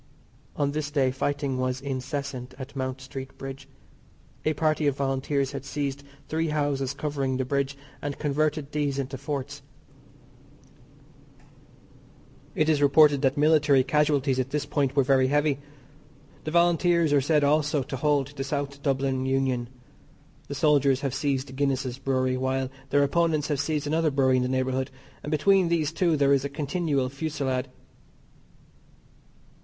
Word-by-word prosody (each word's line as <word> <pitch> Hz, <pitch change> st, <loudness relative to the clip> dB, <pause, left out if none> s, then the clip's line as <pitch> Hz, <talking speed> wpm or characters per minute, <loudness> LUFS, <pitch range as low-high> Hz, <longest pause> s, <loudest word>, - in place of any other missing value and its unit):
On 140 Hz, -1 st, 0 dB
this 150 Hz, 0 st, -3 dB
day 135 Hz, -3 st, +1 dB
fighting 140 Hz, 0 st, -2 dB
was 130 Hz, 0 st, -1 dB
incessant 135 Hz, -1 st, -5 dB
at 135 Hz, +1 st, -9 dB
Mount 130 Hz, 0 st, -3 dB
Street 135 Hz, +1 st, -8 dB
Bridge. 135 Hz, 0 st, -8 dB, 0.8 s
A 155 Hz, -, +2 dB
party 155 Hz, 0 st, +1 dB
of 140 Hz, -1 st, 0 dB
Volunteers 135 Hz, 0 st, 0 dB
had 140 Hz, -2 st, -6 dB
seized 140 Hz, 0 st, -3 dB, 0.3 s
three 160 Hz, +1 st, -1 dB
houses 145 Hz, -3 st, -1 dB
covering 140 Hz, -3 st, -2 dB
the 130 Hz, -, -1 dB
bridge 140 Hz, +1 st, -1 dB, 0.2 s
and 145 Hz, -1 st, -4 dB
converted 150 Hz, 0 st, -1 dB
these 145 Hz, -2 st, -1 dB
into 135 Hz, 0 st, -3 dB
forts. 140 Hz, 0 st, -5 dB, 2.9 s
It 155 Hz, -, +2 dB
is 155 Hz, -2 st, +2 dB
reported 145 Hz, 0 st, +5 dB
that 135 Hz, -1 st, +1 dB
military 145 Hz, -3 st, +4 dB
casualties 145 Hz, -2 st, +1 dB
at 130 Hz, 0 st, -1 dB
this 150 Hz, +1 st, -2 dB
point 140 Hz, -2 st, 0 dB
were 140 Hz, -, +4 dB
very 130 Hz, 0 st, +3 dB
heavy. 145 Hz, 0 st, +1 dB, 0.9 s
The -, -, -2 dB
Volunteers 170 Hz, -1 st, +3 dB
are 145 Hz, -, +4 dB
said 150 Hz, +1 st, +2 dB
also 150 Hz, -1 st, +2 dB
to 135 Hz, -, -6 dB
hold 145 Hz, 0 st, +1 dB
the 145 Hz, -2 st, -5 dB
South 140 Hz, 0 st, -3 dB
Dublin 135 Hz, -2 st, 0 dB
Union. 130 Hz, -3 st, 0 dB, 0.8 s
The 140 Hz, -, -5 dB
soldiers 140 Hz, -2 st, +3 dB
have 140 Hz, -3 st, -2 dB
seized 135 Hz, -2 st, -2 dB
Guinness's 135 Hz, -2 st, -1 dB
Brewery, 130 Hz, -1 st, 0 dB
while 130 Hz, 0 st, -1 dB, 0.2 s
their 145 Hz, +1 st, +4 dB
opponents 155 Hz, 0 st, +1 dB
have 145 Hz, -3 st, 0 dB
seized 150 Hz, 0 st, -1 dB
another 160 Hz, +2 st, +1 dB
brewery 135 Hz, -2 st, +3 dB
in -, -, +2 dB
the 125 Hz, -, -1 dB
neighbourhood, 130 Hz, 0 st, -1 dB, 0.3 s
and -, -, -6 dB
between 185 Hz, +4 st, +3 dB
these 165 Hz, -3 st, +1 dB
two 165 Hz, -2 st, +2 dB
there 140 Hz, -1 st, +4 dB
is 135 Hz, -1 st, +2 dB
a 140 Hz, -, -3 dB
continual 145 Hz, -2 st, -1 dB
fusilade. 135 Hz, -2 st, -2 dB
140 Hz, 150 wpm, -26 LUFS, 135-150 Hz, 2.9 s, reported